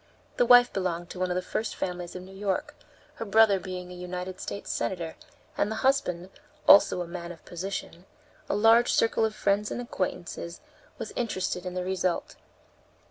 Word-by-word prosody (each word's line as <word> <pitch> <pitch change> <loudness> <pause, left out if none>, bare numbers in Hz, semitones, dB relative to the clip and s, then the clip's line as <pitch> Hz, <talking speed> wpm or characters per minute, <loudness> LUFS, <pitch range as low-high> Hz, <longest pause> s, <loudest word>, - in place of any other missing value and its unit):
The 245 - +3
wife 245 0 +7
belonged 175 -2 -2
to 180 - -8
one 185 0 0
of 180 - -1
the 180 - -1
first 215 +4 -3
families 180 -1 -4
of 180 - -6
New 190 +1 -12
York, 195 -1 -2 0.4
her - - -3
brother 210 -1 +5
being 180 -1 -6
a - - -8
United 180 +1 -6
States 200 - -5
senator, 170 -3 -2 0.4
and 205 - +1
the 220 - -3
husband, 185 -9 +1 0.4
also, 195 -2 +7
a - - -9
man 170 0 -6
of 170 - -13
position; 180 0 -6 0.4
a - - +1
large 225 +3 +5
circle 225 0 +3
of 220 -1 -2
friends 205 +1 +1
and - - -4
acquaintances 175 -6 -4 0.4
was - - -6
interested 185 -5 -2
in 180 - -5
the 180 0 -2
result. 185 -1 -1
185 Hz, 180 wpm, -28 LUFS, 180-205 Hz, 0.4 s, wife